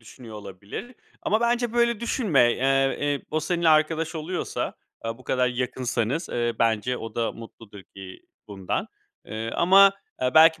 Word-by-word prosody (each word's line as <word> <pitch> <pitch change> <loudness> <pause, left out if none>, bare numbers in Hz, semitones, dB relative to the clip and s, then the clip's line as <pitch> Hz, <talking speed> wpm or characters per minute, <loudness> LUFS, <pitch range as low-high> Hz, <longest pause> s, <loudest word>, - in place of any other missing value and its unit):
düşünüyor 115 0 -12
olabilir. 100 - -9 0.3
Ama 215 +2 +1
bence 240 0 +1
böyle 235 -2 +2
düşünme. 165 - +2
Eee, 135 +1 +1
eee, 145 -1 -1
o 155 +1 0
seninle 170 0 0
arkadaş 155 +1 +2
oluyorsa, 165 +3 -3 0.3
aaa, 115 +1 -4
bu 130 - -16
kadar 125 -1 +1
yakınsanız, 125 +3 -2
eee, 120 -1 -1
bence 115 +2 +1
o 115 -1 -8
da 115 -1 -1
mutludur 110 -3 -12
ki 95 -1 -10 0.3
bundan. 95 -2 -3 0.4
Eee, 110 +1 -5
ama, 195 +3 +6 0.3
eee, 125 - +2
belki 160 0 +7
130 Hz, 155 wpm, -25 LUFS, 115-170 Hz, 0.4 s, belki